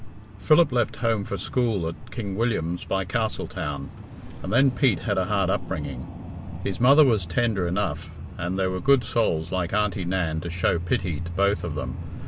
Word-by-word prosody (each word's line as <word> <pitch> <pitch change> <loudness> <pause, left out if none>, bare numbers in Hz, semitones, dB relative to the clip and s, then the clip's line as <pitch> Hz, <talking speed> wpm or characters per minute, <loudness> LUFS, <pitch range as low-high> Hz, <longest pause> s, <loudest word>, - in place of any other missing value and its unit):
IV. - - -16
Philip 155 -1 +6
left 120 -3 +1
home 115 -3 0
for 100 - -4
school 110 -3 0
at 80 - -8
King 100 -6 -5
William's 95 -7 -1
by 95 -1 -1
Castletown, 90 - -3 0.5
and 95 - -5
then 135 +4 +5
Pete 125 - +2
had - - 0
a - - +1
hard - - +1
upbringing. - - -4 0.6
His 100 +3 -3
mother 140 +5 +7
was 110 -9 +2
tender 100 0 0
enough, 95 +3 -2 0.3
and 90 +2 -3
there 95 -1 +1
were 95 - -2
good 135 -2 +4
souls 95 -9 0
like 90 -2 -1
Aunty 105 -2 +1
Nan 85 -3 -1
to 85 - -5
show 85 0 +1
pity 85 -2 -1
to 85 +1 -6
both 100 +3 +1
of 85 -4 -4
them. 70 - -4
95 Hz, 185 wpm, -25 LUFS, 85-115 Hz, 0.6 s, mother